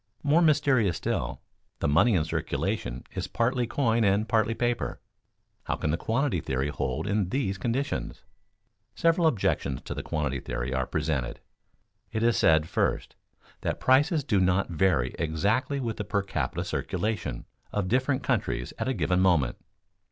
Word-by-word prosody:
More 150 +4 +4
mysterious 140 - +3
still, - - -2 0.4
the - - -1
money 100 +10 +4
in 80 - +3
circulation 60 -5 -2
is - - -3
partly 120 +1 0
coin 115 -3 +1
and 100 +2 +2
partly 110 +1 +2
paper. 120 0 -1 0.7
How - - -1
can 75 - -1
the - - +2
quantity 115 - 0
theory 65 +2 -1
hold 65 0 -2
in 100 -2 0
these 100 -7 -1
conditions? 130 +4 -2 0.7
Several 165 0 +3
objections 95 - 0
to - - -5
the - - -4
quantity 70 -4 -2
theory - - -4
are 65 -1 0
presented. 65 -6 -2 0.7
It 110 0 -1
is 120 0 +4
said, 80 -1 +4
first, - - -1 0.5
that - - -2
prices 145 +4 +3
do 110 -7 +2
not 95 +1 +2
vary 80 -7 +2
exactly 100 - 0
with 115 -4 -3
the - - -2
per 100 -2 -1
capita 100 - -2
circulation 110 0 -2 0.3
of 105 -3 -1
different 130 +4 +1
countries - - -1
at - - -1
a 130 - 0
given 90 0 +1
moment. 85 -10 +3
105 Hz, 155 wpm, -27 LUFS, 80-130 Hz, 0.7 s, More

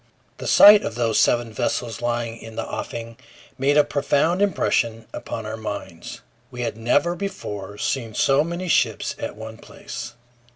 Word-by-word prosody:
The - - -5
sight 210 0 +9
of 110 - -4
those 115 -2 +1
seven 120 -2 +2
vessels 115 0 -2
lying 120 -1 -2
in 115 -1 -11
the - - -3
offing 115 -1 -6 0.4
made 140 +2 +2
a 150 - +7
profound 145 +6 +1
impression 115 - 0
upon 110 - -6
our 110 +1 -5
minds. 100 -5 -7 0.3
We 125 - -7
had 120 - -2
never 120 +10 +1
before 105 - -6
seen 115 -1 -2
so 135 +2 +3
many 170 +3 -4
ships - - +1
at - - -5
one 110 +1 -9
place. - - -9
120 Hz, 160 wpm, -23 LUFS, 110-145 Hz, 0.4 s, sight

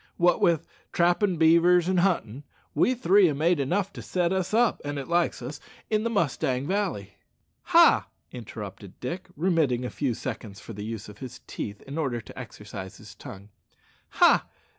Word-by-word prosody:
Wot 175 0 +3
with 170 -3 +3 0.3
trappin' 175 +2 +2
beavers 170 +2 +5
and 185 -1 +2
huntin', 145 - 0 0.3
we 255 - +2
three 200 -4 +5
ha' 145 - -2
made 165 +3 +2
enough 185 +8 -1
to - - -8
set 180 0 0
us 190 -2 -1
up, 235 +2 +2
an 145 0 -4
it 135 - -5
likes 170 -6 0
us, 145 +4 -6 0.3
in 215 0 +2
the 230 - 0
Mustang 140 - 0
Valley 170 - -2 0.2
" - - -47
"Ha!" - - +7 0.2
interrupted 105 -5 -9
Dick, 170 +9 -5
remitting 160 -7 +1
for 125 - -3
a - - -12
few 130 -5 -1
seconds 110 -6 -7
the 105 -2 -7
use 110 -1 -6
of 105 0 -13
his 130 -2 -9
teeth 105 -1 -6
in 140 +4 -6
order 130 -6 -1
to 115 - -12
exercise 105 -5 -9
his 105 -1 -13
tongue 100 -1 -11 0.6
ha! - - +4
145 Hz, 180 wpm, -26 LUFS, 115-180 Hz, 0.6 s, Ha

